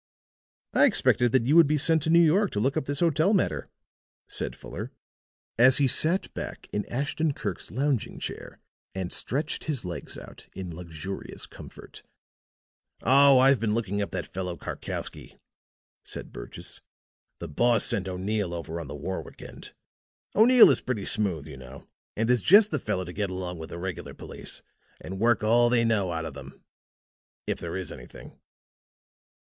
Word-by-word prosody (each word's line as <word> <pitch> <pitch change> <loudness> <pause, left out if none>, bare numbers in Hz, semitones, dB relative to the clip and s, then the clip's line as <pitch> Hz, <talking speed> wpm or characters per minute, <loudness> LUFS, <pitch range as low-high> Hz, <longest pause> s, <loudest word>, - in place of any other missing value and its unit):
"I - - +6
expected 120 -1 +2
that 125 -2 +2
you 145 +5 +3
would 170 -3 +7
be 150 +1 +1
sent 160 +2 +2
to 160 - -2
New 170 +1 +6
York 190 +6 +3
to 105 - -1
look 135 +6 0
up - - -1
this 145 +3 -3
hotel 165 +5 +3
matter," 185 - -1 0.6
said - - -4
Fuller, - - -8 0.7
as 125 +2 +7
he 140 - +3
sat 160 +8 +2
back - - -7
in 105 - -2
Ashton 145 +4 -1
Kirk's 100 -5 -5
lounging 135 0 -1
chair - - -7 0.4
and 95 -2 -4
stretched 150 +4 -2
his 145 -10 -2
legs 90 -1 -6
out - - -12
in 90 -3 -6
luxurious 85 +2 -7
comfort. - - -13 1.0
"Oh, 140 +1 +8
I've 135 0 +5
been 110 -1 0
looking 105 -3 -2
up 100 - -2
that - - -6
fellow 90 -2 -4
Karkowsky," - - -6 0.7
said - - -5
Burgess. - - -8 0.6
"The 85 - -7
boss 115 +8 +3
sent 95 -1 +1
O'Neill 95 0 -2
over 85 0 -5
on 85 - -7
the 70 - -7
Warwick 95 +6 -6
end. - - -11 0.6
O'Neill 240 +3 +8
is - - 0
pretty 110 -6 -3
smooth, 95 -9 0
you 75 -4 -10
know, 65 +1 -12 0.3
and 110 +1 0
is 125 -3 +2
just 205 - +6
the 155 - 0
fellow 105 -5 -2
to 90 - -8
get 100 0 -2
along 90 -2 -5
with 80 - -8
the - - -7
regular 90 0 -6
police, - - -8 0.4
and 95 0 -7
work 115 0 +2
all 120 +2 +4
they 120 -1 +2
know 105 -5 +1
out 80 -1 -3
of 80 - -6
them 70 - -12 0.8
if - - -3
there - - -5
is 95 -4 -4
anything." - - -12
110 Hz, 170 wpm, -26 LUFS, 90-140 Hz, 1.0 s, Oh